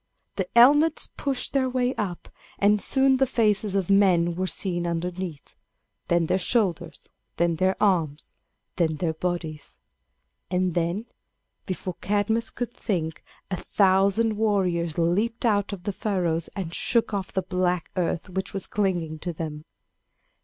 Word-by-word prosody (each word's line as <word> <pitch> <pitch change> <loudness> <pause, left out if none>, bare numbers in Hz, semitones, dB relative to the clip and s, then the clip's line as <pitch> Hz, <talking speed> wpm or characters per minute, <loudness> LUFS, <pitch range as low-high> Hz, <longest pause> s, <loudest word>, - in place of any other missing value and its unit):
The 190 -2 -2
helmets 290 +6 +5
pushed 275 -3 -2
their 265 -2 +2
way 250 0 0
up, 190 -8 -4 0.3
and 205 +1 +3
soon 265 -1 +3
the 270 0 +2
faces 210 -4 +1
of 195 -1 0
men 180 -4 +4
were 185 +2 -2
seen 175 -2 0
underneath, 170 -2 -4 0.5
then 170 -1 +2
their 185 - +1
shoulders, 180 -5 0 0.3
then 170 -1 +1
their 185 +3 +2
arms, 165 -8 0 0.4
then 160 -3 +1
their 160 +1 -1
bodies; 160 -2 -4 0.7
and 180 -1 0
then, 175 +6 -1 0.6
before 185 -1 -4
Cadmus 210 +3 0
could 240 0 -5
think, 165 -7 -3 0.3
a - - +1
thousand 200 +4 +2
warriors 180 -6 0
leaped 205 +9 +1
out 205 -3 +2
of 195 -3 -7
the 205 - -2
furrows 180 -5 -1
and 180 -5 -4
shook 230 +2 +1
off 195 -2 -3
the 190 - -1
black 180 -2 -1
earth 175 -1 -1
which 190 +1 -4
was 195 - -2
clinging 175 -6 -1
to 175 +2 -3
them. 155 -1 -6
185 Hz, 145 wpm, -25 LUFS, 170-210 Hz, 0.7 s, helmets